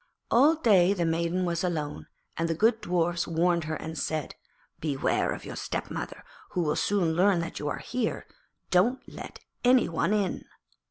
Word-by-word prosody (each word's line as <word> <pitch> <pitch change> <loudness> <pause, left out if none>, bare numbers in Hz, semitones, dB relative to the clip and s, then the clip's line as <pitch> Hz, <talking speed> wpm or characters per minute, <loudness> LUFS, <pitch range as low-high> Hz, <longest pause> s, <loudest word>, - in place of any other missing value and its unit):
All 285 +7 +6
day 200 - +4
the 175 -3 0
maiden 170 +2 0
was 170 0 -1
alone, 150 - -3 0.3
and 165 0 -1
the 165 - 0
good 220 +5 +3
Dwarfs 175 -2 0
warned 170 0 +1
her 155 0 -2
and 160 +1 -6
said, 155 -2 -2 0.5
'Beware 145 -4 0
of - - -6
your - - -6
stepmother, - - -5 0.3
who 180 - +1
will 150 -1 0
soon 185 -6 +1
learn 185 +2 +3
that 165 - -5
you 150 - -3
are 145 - -2
here. 250 -3 -3 0.5
Don't 220 +9 +3
let - - -9 0.2
any 250 0 +5
one 165 +4 0
in.' 205 -3 0
175 Hz, 170 wpm, -28 LUFS, 165-205 Hz, 0.5 s, All